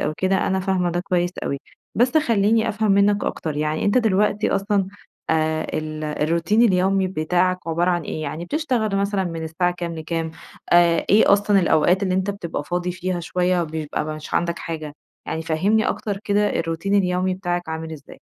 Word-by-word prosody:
أو 155 - -1
كده 190 0 +1
أنا 190 0 0
فاهمة 185 -2 0
ده 175 - -1
كويس 180 -1 0
أوي. 140 - -2 0.4
بس 250 +6 +2
خليني 225 -4 +2
أفهم 215 -1 +1
منك 200 +1 +3
أكتر 155 -2 -3
يعني 155 +1 -1
أنتَ 205 +5 +3
دلوقتي 210 -1 +1
أصلًا 195 -1 +1 0.4
آآ 160 0 +1
ال 155 0 -5
الروتين 165 +8 +1
اليومي 190 -2 +3
بتاعك 180 +2 +1
عبارة 170 +2 +1
عن 175 -1 0
إيه؟ 155 +1 -5
يعني 155 +3 -4
بتشتغل 240 - -1
مثلًا 200 -1 0
من 165 -2 -4
الساعة 175 +3 0
كام 175 -1 -5
لكام؟ 160 0 -3 0.4
آآ 170 -1 +4
إيه 205 0 +6
أصلًا 205 -1 +4
الأوقات 175 +3 +3
اللي 185 -2 0
أنتَ 190 +2 0
بتبقى 170 -7 -5
فاضي 180 +2 -2
فيها 180 0 -3
شوية 180 +1 0
بيبقى 155 -1 -3
مش 155 0 -6
عندك 170 -1 0
حاجة؟ 155 -3 -5 0.3
يعني 160 - -3
فهّمني 190 +7 +1
أكتر 205 -2 -3
كده 205 0 +1
الروتين 165 +5 -2
اليومي 185 -1 +1
بتاعك 175 -2 -3
عامل 160 0 -5
إزاي؟ 150 -2 -12
180 Hz, 175 wpm, -22 LUFS, 160-200 Hz, 0.4 s, إيه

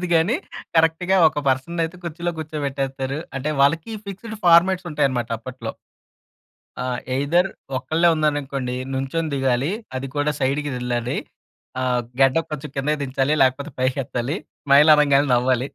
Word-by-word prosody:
తెలీదు 180 - -2
గాని 165 +8 +3 0.4
కరెక్ట్‌గా 165 +4 +3
ఒక 150 -1 -4
పర్సన్‌ని 135 +6 0
అయితే 165 +2 -6
కుర్చీలో 170 +1 -3
కూర్చోబెట్టేస్తారు. 140 -3 -3 0.2
అంటే 140 +3 -2
వాళ్ళకి 155 +8 +2 0.2
ఫిక్స్‌డ్ 215 +3 -7
ఫార్మాట్స్ 175 +2 +5
ఉంటాయన్నమాట 130 -6 0
అప్పట్లో. 120 -1 -6 1.1
ఆ! - - -3 0.3
ఎ‌‌య్‌దర్ 165 +8 +2 0.3
ఒక్కళ్ళే 160 +6 +2
ఉన్నాననుకోండి, 140 -4 -1 0.2
నుం‌చొని 135 +5 -2
దిగాలి. 135 +1 +1 0.3
అది 130 +1 -3
కూడా 145 +1 +1
సైడ్‌కి 140 +2 0
వెళ్ళాలి. 125 -1 -2 0.7
ఆహ్, 125 -1 +1 0.2
గడ్డం 135 +5 +4
కొంచెం 150 -3 -5
కిందకి 145 +2 0
దించాలి 135 +1 0
లేకపోతే 135 +4 +1
పైకి 130 +2 +1
ఎత్తాలి. 125 +6 -3 0.3
స్మైల్ 145 +2 +7
అనంగానే 145 -1 +4
నవ్వాలి. 125 +2 +1
140 Hz, 135 wpm, -22 LUFS, 130-160 Hz, 1.1 s, స్మైల్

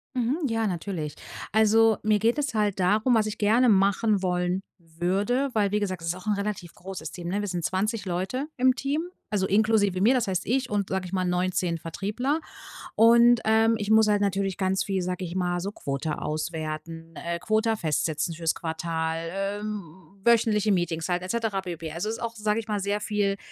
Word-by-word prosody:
Mhm. 260 +6 0
Ja, 225 -2 0
natürlich. 170 -5 -3 0.4
Also, 220 +1 +4
mir 215 -1 +2
geht 230 +5 +2
es 280 -3 -1
halt 210 -3 0
darum 215 +7 +3
was 220 -1 +3
ich 215 0 -4
gerne 225 +5 +3
machen 200 +1 +3
wollen 180 0 0 0.2
würde, 190 +11 -1
weil 205 -3 +1
wie 210 - +1
gesagt, 185 -4 -3
ist 165 +1 -2
auch 185 - -11
'n 210 - +3
relativ 200 -4 -4
großes 180 -4 -7
Team, 175 -1 -7
ne? 195 +4 -1
Wir 205 - -3
sind 175 -3 -2
20 210 +4 -1
Leute 190 +10 -2
im 255 0 +3
Team, 280 +3 -1 0.3
also 200 -2 0
inklusive 205 -2 +2
mir, 220 +7 +5
das 245 -4 +1
heißt 185 -1 -1
ich 255 +2 0
und, 205 -2 -1
sage 190 -1 -1
ich 180 - -8
mal, 185 -1 0
19 180 -1 0
Vertriebler. 210 - -2 0.6
Und, 235 +1 +6
ähm, 225 +1 +4
ich 210 0 -2
muss 220 0 +6
halt 205 -1 +2
natürlich 195 -2 0
ganz 190 -1 +1
viel, 195 -2 -1
sage 180 +1 -3
ich 175 0 -5
mal, 175 -1 0
so 200 +3 -3
„Quota 145 -3 -3
auswerten, 160 +1 -5
ähm, 170 +1 -4
Quota 220 +3 +1
festsetzen 160 -2 -1
fürs 165 0 -1
Quartal, 160 0 -3
ähm, 205 +2 -3 0.4
wöchentliche 220 -3 +3
Meetings 170 -3 -1
halt 175 0 0
et 185 - -7
cetera 225 -4 -1
pp“. 165 -3 -6
Also 175 +6 -3
ist 225 - -4
auch, 230 -1 -4
sage 210 0 0
ich 225 - -7
mal, 210 -2 -1
sehr 200 +1 -1
viel- 205 -2 0
200 Hz, 195 wpm, -26 LUFS, 175-220 Hz, 0.6 s, Und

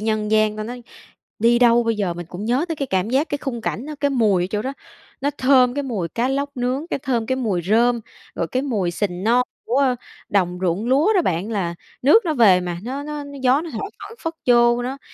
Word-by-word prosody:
nhân 215 -1 -1
gian". 215 -1 +2
Ta 215 - -3
nói, 245 +2 -7 0.6
đi 235 +2 +4
đâu 240 -1 +5
bây 230 -1 +1
giờ 190 -5 -1
mình 175 0 -7
cũng 180 +5 -7
nhớ 250 +7 +1
tới 325 - -3
cái 280 -2 -2
cảm 190 +1 -1
giác, 280 +5 +1
cái 290 - -2
khung 255 -5 -4
cảnh 235 +5 -3
đó, 305 - -6
cái 285 -1 +2
mùi 210 -8 +2
ở - - -1
chỗ 210 0 -1
đó, 265 - -3 0.5
nó 285 +1 0
thơm 255 -1 +4
cái 285 - -1
mùi 210 -11 -3
cá 235 +9 -1
lóc 280 +1 -1
nướng, 255 +5 -1
cái - - -1
thơm 245 -4 -1
cái 260 +2 0
mùi 205 -9 -1
rơm, 235 +5 +2 0.3
rồi 170 - -2
cái 255 +8 -1
mùi 210 -11 -1
sình 180 0 -3
non 245 +2 +4 0.2
của, 245 - -1
ơ, 260 -3 +2 0.3
đồng 180 -3 +1
ruộng 185 +6 0
lúa 290 - +3
đó 370 - +4
bạn 180 - -1
là 180 -6 -2 0.3
nước 310 - +6
nó 315 - +1
về 200 -7 +5
mà 175 -1 -4
nó 270 +3 -4
nó 295 0 -5
nó 285 0 -9
gió 260 +3 +4
nó 335 - -7
thổi 315 - -4
phảng 415 +3 -10
phất 325 -1 -3
vô 240 0 +4
đó. 265 +3 -4
240 Hz, 250 wpm, -21 LUFS, 210-275 Hz, 0.6 s, nước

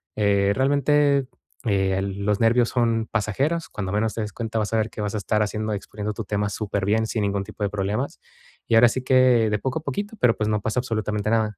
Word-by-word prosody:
eh, 100 -1 +2
realmente, 140 0 +2 0.4
eh, 95 -3 +1
los 100 +1 -1
nervios 120 +1 +4
son 115 -2 +1
pasajeros. 135 +10 -1
Cuando 95 -3 -4
menos 110 +1 0
te 115 - -2
des 105 -1 -5
cuenta, 115 -1 -3
vas 105 +1 -2
a - - +3
ver 110 0 0
que - - -7
vas 105 -1 -2
a - - -1
estar 105 +1 0
haciendo, 110 +1 -3
exponiendo 105 +1 -5
tu 110 +1 -6
tema 105 +1 -1
superbién, 105 +1 -1
sin 110 - -2
ningún 100 -1 -1
tipo 105 - -7
de 100 - +1
problemas. 105 +6 -2 0.5
Y 115 - +3
ahora 115 +1 +7
sí 130 - -3
que 125 -4 +4
de 105 - 0
poco 130 +7 -2
a - - -16
poquito, 205 +5 -4
pero 120 -2 +4
pues 110 0 0
no 105 - +1
pasa 110 +4 -1
absolutamente 105 -3 -2
nada. 110 -3 +1
110 Hz, 225 wpm, -24 LUFS, 105-120 Hz, 0.5 s, ahora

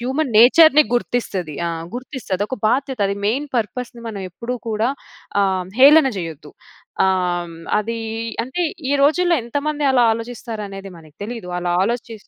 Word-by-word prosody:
Human 265 +2 -1
నేచర్‌ని 305 +5 +7
గుర్తిస్తది. 195 -10 -2
ఆ! - - 0 0.3
గుర్తిస్తది. 250 -6 -4
ఒక 260 - -3
బాధ్యత 265 +1 0
అది 200 - -2
మెయిన్ 265 +8 0
పర్పస్‌ని 235 +2 -3
మనం 205 -3 -6
ఎప్పుడు 235 +7 -5
కూడా 220 +3 0 0.5
ఆహ్, 190 -2 0
హేళన 285 +1 +7
చేయొద్దు. 160 -4 -7 0.5
ఆహ్, 175 -2 0 0.2
అది 230 +2 -3 0.5
అంటే 260 +9 -5 0.3
ఈ - - +2
రోజుల్లో 345 +4 +3
ఎంతమంది 290 +5 -2
అలా 250 -2 +4
ఆలోచిస్తారు 230 -1 -6
అనేది 195 0 -8
మనకి 155 -2 -17
తెలియదు. 225 -4 -6
అలా 175 0 -2
ఆలోచి 235 +2 -2
235 Hz, 140 wpm, -20 LUFS, 195-265 Hz, 0.5 s, నేచర్‌ని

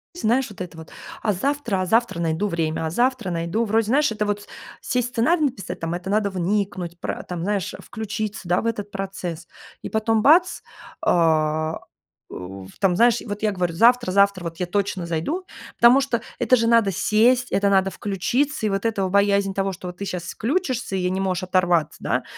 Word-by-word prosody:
Знаешь, 255 -5 +1
вот 200 - -10
это 175 -2 -7
вот: 160 0 -11 0.3
"А 210 - +1
завтра, 235 -2 -1
а - - -1
завтра 225 -2 +1
найду 165 +4 0
время, 160 -2 -1
а - - -1
завтра 240 +2 0
найду". 170 +7 -1
Вроде, 220 0 +1
знаешь, 280 +1 +3
это 210 -1 -1
вот 205 0 -3 0.3
сесть, 250 -2 -1
сценарий 300 +8 +2
написать, 230 -9 -4
там 165 +1 -3
это 180 +2 -5
надо 205 0 +1
вникнуть, 185 -2 -2
пра - - -4
там, 175 -2 -4
знаешь, 200 -3 -2
включиться, 215 -1 -5
да, 175 - +2
в - - -7
этот 210 -3 -2
процесс, 180 -4 -5 0.3
и - - -6
потом 220 0 +1
бац- 340 +8 +4 0.4
а, 155 -1 +2 0.5
у, 95 +1 -8
там, 190 -3 +3
знаешь, 235 0 +4
вот 205 -2 -5
я 215 - +1
говорю: 180 -2 -1
"Завтра 240 +2 +4
завтра 200 -2 +3
вот 165 -1 -6
я 180 - -1
точно 190 -1 -2
зайду". 170 - -2 0.3
Потому 245 +3 +6
что 245 -4 -1 0.2
это 255 - +4
же 230 0 +1
надо 230 -4 +4
сесть, 240 +7 +2
это 200 0 +3
надо 195 -1 +3
включиться, 220 +9 -1
и - - +2
вот 195 +2 -2
эта 210 -4 0
вот 185 - -1
боязнь 200 -1 +2
того, 195 0 -1
что 180 0 -7
ты 200 - -8
сейчас 180 -2 -4
включишься 245 - -2
и - - -1
я 180 - 0
не 190 +1 -1
можешь 185 -1 -1
оторваться, 180 -4 +1
да, - - -1
200 Hz, 195 wpm, -23 LUFS, 180-230 Hz, 0.5 s, Потому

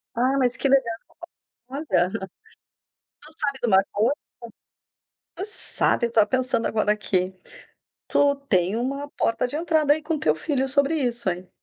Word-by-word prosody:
Ah, 260 +3 +2
mas 250 -2 +1
que - - +1
legal. 265 -4 +3 0.7
Olha, 225 - 0 1.1
tu 305 - -12
sabe 275 -1 -1
de 245 - 0
uma 195 -2 +5
coisa, 220 +6 +2 1.2
tu 370 +4 -4
sabe, 410 - 0
eu - - -11
tava 220 -2 +4
pensando 250 -1 0
agora 215 -1 +1
aqui, 190 -3 0 0.8
tu 285 0 +3
tem 185 +2 +2
uma 275 +4 -3
porta 230 +2 +1
de 285 - -4
entrada 315 -3 +3
aí 310 - -5
com 320 -1 -2
teu 155 - +2
filho 270 - -1
sobre 280 +3 +2
isso, 240 -7 0
heim. 180 +1 -6
250 Hz, 155 wpm, -24 LUFS, 210-285 Hz, 1.2 s, uma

